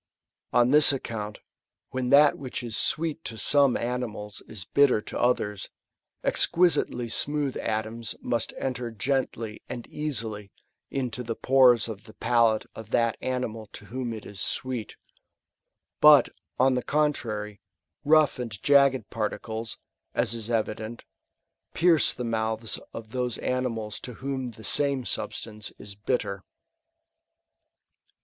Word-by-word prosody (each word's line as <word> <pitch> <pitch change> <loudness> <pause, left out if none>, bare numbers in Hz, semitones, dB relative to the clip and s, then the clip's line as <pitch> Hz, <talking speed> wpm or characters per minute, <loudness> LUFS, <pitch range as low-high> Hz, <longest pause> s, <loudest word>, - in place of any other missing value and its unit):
On 120 +1 +4
this 150 0 +8
account, 110 -6 -5 0.5
when 130 -1 -2
that 145 +2 +7
which 130 -2 -5
is 115 -2 -4
sweet 160 0 0
to 110 - -6
some 140 +1 +4
animals 115 -4 -4
is 100 -5 -7
bitter 140 -5 +4
to - - -6
others, 105 -5 0 0.5
exquisitely 165 -8 +2
smooth 145 +4 -1
atoms 110 +1 -3
must 120 -2 -1
enter 125 -2 -3
gently 115 -1 -2
and 120 -1 -6
easily 110 -9 -4 0.4
into 125 -3 -3
the 115 -1 -4
pores 125 -4 +5
of 110 -1 -8
the 110 - -14
palate 115 -2 +2
of 110 -1 -10
that 115 -1 +2
animal 115 -4 -3
to - - -9
whom 130 -2 -2
it 110 -2 -7
is 100 - -7
sweet; 125 -4 -2 1.0
but, 150 -2 +8 0.3
on 130 +1 +4
the 125 - 0
contrary, 110 -10 -1 0.4
rough 155 -2 +4
and 115 -5 -5
jagged 140 -5 +4
particles, 110 +1 -4 0.4
as - - +1
is 115 -1 -4
evident, 110 0 -2 0.7
pierce 165 -3 +4
the 125 - -5
"mouths 110 -1 -2
of 110 -1 -9
those 125 -1 -2
animals 115 -5 -2
to 125 - -7
whom 135 -2 -3
the 110 -1 -13
same 140 +2 +3
substance 105 -2 -4
is 100 -1 -9
bitter. 100 -2 -2
120 Hz, 130 wpm, -27 LUFS, 110-130 Hz, 1.0 s, this